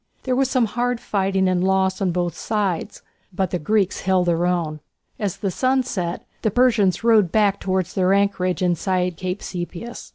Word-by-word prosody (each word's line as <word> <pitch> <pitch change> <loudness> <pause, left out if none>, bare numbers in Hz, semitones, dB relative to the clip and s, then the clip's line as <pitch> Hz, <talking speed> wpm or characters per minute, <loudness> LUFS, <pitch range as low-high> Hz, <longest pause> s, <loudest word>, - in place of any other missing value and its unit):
There 255 -1 0
was 265 0 +2
some 255 -3 +2
hard 245 +2 -1
fighting 195 -2 0
and 180 -1 +1
loss 190 0 +1
on 190 - +2
both 175 -1 -1
sides, 205 -6 -2 0.3
but 190 -1 -2
the 180 - -1
Greeks 205 +3 0
held 185 -1 +2
their 175 0 +1
own. 165 -4 -1 0.4
As 200 -4 -2
the 195 -2 -2
sun 260 +6 +1
set 180 -7 -4 0.2
the 220 - +1
Persians 215 -5 +2
rowed 220 -7 +4
back 205 -2 +2
towards 185 -2 -1
their 185 -1 +2
anchorage 195 -3 +1
inside 180 0 0
Cape 185 +3 -4
Sepias. 180 +6 -6
190 Hz, 175 wpm, -22 LUFS, 180-215 Hz, 0.4 s, rowed